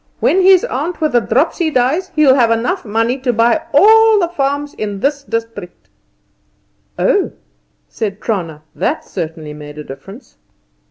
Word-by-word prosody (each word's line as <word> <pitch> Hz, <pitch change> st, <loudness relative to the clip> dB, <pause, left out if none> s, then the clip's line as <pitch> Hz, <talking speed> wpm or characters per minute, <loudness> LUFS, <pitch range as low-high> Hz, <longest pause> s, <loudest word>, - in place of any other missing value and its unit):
When 380 Hz, -, +2 dB
his 375 Hz, -1 st, +5 dB
aunt 305 Hz, +7 st, -4 dB
with 310 Hz, -2 st, 0 dB
the 240 Hz, -, +4 dB
dropsy 305 Hz, -, 0 dB
dies 305 Hz, +8 st, 0 dB
he'll 300 Hz, -4 st, +5 dB
have 245 Hz, -4 st, +3 dB, 0.4 s
money 225 Hz, +3 st, 0 dB
enough 260 Hz, 0 st, -9 dB
to 250 Hz, -, +2 dB
buy 235 Hz, +7 st, +2 dB
all 440 Hz, +7 st, +6 dB
the 350 Hz, -4 st, +1 dB
farms 285 Hz, -2 st, -2 dB
in 205 Hz, -2 st, -5 dB
this 280 Hz, +4 st, -1 dB
district." 230 Hz, -8 st, -6 dB, 1.1 s
"Oh!" -, -, +1 dB, 0.5 s
said 205 Hz, -2 st, -5 dB
Trana. 165 Hz, -9 st, -4 dB
That -, -, -2 dB
certainly 155 Hz, -2 st, -6 dB
made 150 Hz, 0 st, -11 dB
a 150 Hz, -, -7 dB
difference. 195 Hz, -, -12 dB
250 Hz, 150 wpm, -16 LUFS, 205-310 Hz, 1.1 s, all